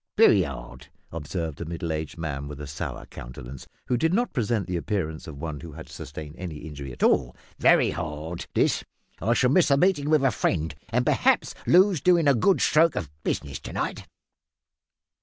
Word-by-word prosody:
"Very - - +7
hard," 65 +2 -6 0.2
observed 80 0 -4
a - - -3
middle 85 +1 -4
aged 80 0 -4
man 70 -4 -4
with 75 -1 -8
a 75 - -5
sour 70 -4 -5
countenance, 60 +2 -9 0.2
who 125 - +1
did 160 +8 +2
not 240 +3 0
present 115 -5 0
the 90 - -3
appearance 85 -4 -3
of 75 -3 -8
one 75 0 -5
who 80 -1 -9
had 80 +2 -9
sustained 75 +2 -8
any 90 -4 -5
injury 75 -3 -7
at - - -5
all, - - +3 0.2
"very - - +5
hard 80 +1 -5
this. - - +2 0.4
I 115 +3 +2
shall 125 +2 +3
miss 175 +2 +4
meeting 145 +1 +3
with 155 -3 +4
a 135 - +4
friend, 80 -6 0 0.2
and 125 +2 +1
perhaps - - +2
lose 185 -2 +5
doin' 175 -4 +4
a 140 - +6
good 160 - +3
stroke 160 +1 +4
of 85 -9 -4
business 70 -1 -2
to - - -8
night." - - -3
85 Hz, 185 wpm, -26 LUFS, -, 0.4 s, Very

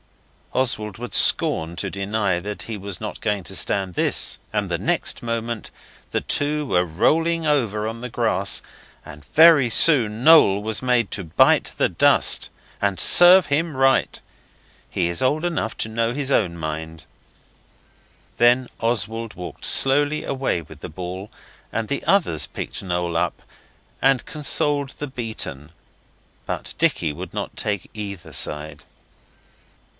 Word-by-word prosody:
Oswald 110 -6 -1
would 120 +1 -8
scorn 80 +2 +2
to 100 - -2
deny 100 -2 -1
that 105 +3 -7
he 115 - -6
was 100 -2 -5
not 105 - -7
going 105 -3 -1
to 95 - -7
stand 95 -2 0
this, - - 0
and - - -1
the - - -3
next - - -1
moment 115 -1 -4 0.4
the - - -1
two 150 +1 +1
were 90 -9 +1
rolling 165 - 0
over 115 -8 0
on 115 +1 -6
the 125 - -6
grass, - - 0 0.4
and 75 0 -12
very 160 -6 +5
soon 115 -4 +4
Noel 150 -12 +6
was 110 0 -2
made 125 -4 +1
to 100 - -3
bite 80 0 +2
the - - +2
dust. - - +2 0.3
And 100 -3 0
serve 180 - +7
him 150 0 -1
right. 135 0 +2 0.7
He 85 - -1
is 85 0 -3
old 150 +6 0
enough 150 -10 -3
to - - -1
know 115 +1 -1
his 140 0 -2
own 90 -9 +1
mind. 80 0 -6 1.3
Then 120 +1 +3
Oswald 115 -1 -2
walked 90 -1 -9
slowly 145 +3 +3
away 135 -10 -2
with - - -15
the - - -7
ball, 90 +5 -7 0.4
and 115 -1 -3
the 140 - -3
others 165 - +1
picked - - -7
Noel 90 -2 -2
up, 85 +1 -2 0.6
and 135 -2 +2
consoled 145 -1 0
the 145 - -5
beaten, 110 - -6 0.7
but - - -5
Dicky 75 -3 0
would 85 +3 -9
not - - -5
take 100 -4 -3
either 100 -4 -8
side. 75 0 -2
110 Hz, 145 wpm, -22 LUFS, 90-135 Hz, 1.3 s, serve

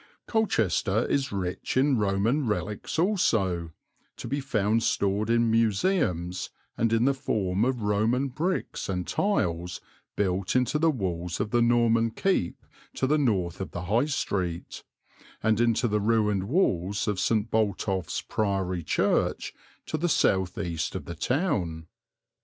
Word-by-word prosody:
Colchester 110 - +1
is 140 -1 0
rich 95 +3 -3
in 135 +1 +4
Roman 110 +6 +1
relics 105 +3 -3
also, 110 - +1 0.5
to - - -6
be 140 +4 -1
found 110 -4 +1
stored 100 0 0
in 115 -1 +3
museums, 105 - +1 0.3
and 115 0 +1
in 115 +1 +3
the 140 - +4
form 105 -7 -1
of 125 -2 0
Roman 110 +6 +1
bricks 165 - -2
and 90 -2 -2
tiles 90 - -1 0.4
built 95 0 0
into 125 +4 +2
the 165 +1 +4
walls 90 - -2
of 105 - -2
the 120 -1 +3
Norman 115 -1 +3
keep 115 - -1 0.3
to - - 0
the 150 +3 +2
north 95 - 0
of 95 - -4
the 85 - -6
High 110 +9 +2
Street, 95 - -3 0.6
and 110 0 +2
into 120 +1 +2
the 105 -1 0
ruined 105 -3 +1
walls 100 - 0
of 105 -3 0
St. 110 +1 +1
Botolph's 100 -4 0
Priory 95 -4 -1
Church, - - 0 0.3
to 155 - -2
the 175 +2 0
south 95 - +2
east 85 -6 -3
of - - -5
the 85 - -6
town. 90 - -1
110 Hz, 145 wpm, -27 LUFS, 95-125 Hz, 0.6 s, in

